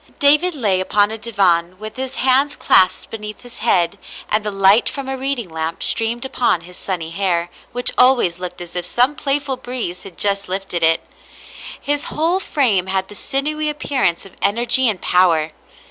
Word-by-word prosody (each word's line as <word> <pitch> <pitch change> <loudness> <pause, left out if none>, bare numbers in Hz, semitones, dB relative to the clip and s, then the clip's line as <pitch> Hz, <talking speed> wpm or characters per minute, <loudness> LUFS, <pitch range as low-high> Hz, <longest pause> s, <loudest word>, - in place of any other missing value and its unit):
David 300 +5 +3
lay 205 -9 0
upon 205 +2 +2
a 220 - -4
divan 185 -5 0
with 215 +2 -9
his 265 0 -5
hands 270 +3 +3
clasped 185 -1 +3
beneath 210 -1 -8
his 245 -1 -11
head, 185 -4 +1 0.3
and 215 0 +3
the 210 - -2
light 195 +2 +4
from 275 -2 -7
a 265 - -3
reading 265 -4 -3
lamp 160 0 -4
streamed 235 +2 +1
upon 245 -9 0
his 180 +1 -13
sunny 170 -4 -4
hair, 175 -2 -1 0.2
which 245 0 +2
always 245 -9 +4
looked 180 -1 -7
as 175 0 -10
if 180 - -2
some 255 +5 +2
playful 280 -2 -1
breeze 245 -8 -4
had 195 -3 -12
just 200 -2 +1
lifted 190 -2 -3
it. 165 0 +2 0.7
His 290 0 -2
whole 335 +4 0
frame 225 - +1
had 190 0 -2
the - - -11
sin 275 +6 -3
ewy 305 0 -2
appearance 265 - -1
of 195 - -14
energy 240 +4 +4
and 200 -4 -3
power. 165 -4 +2
210 Hz, 180 wpm, -18 LUFS, 180-265 Hz, 0.7 s, light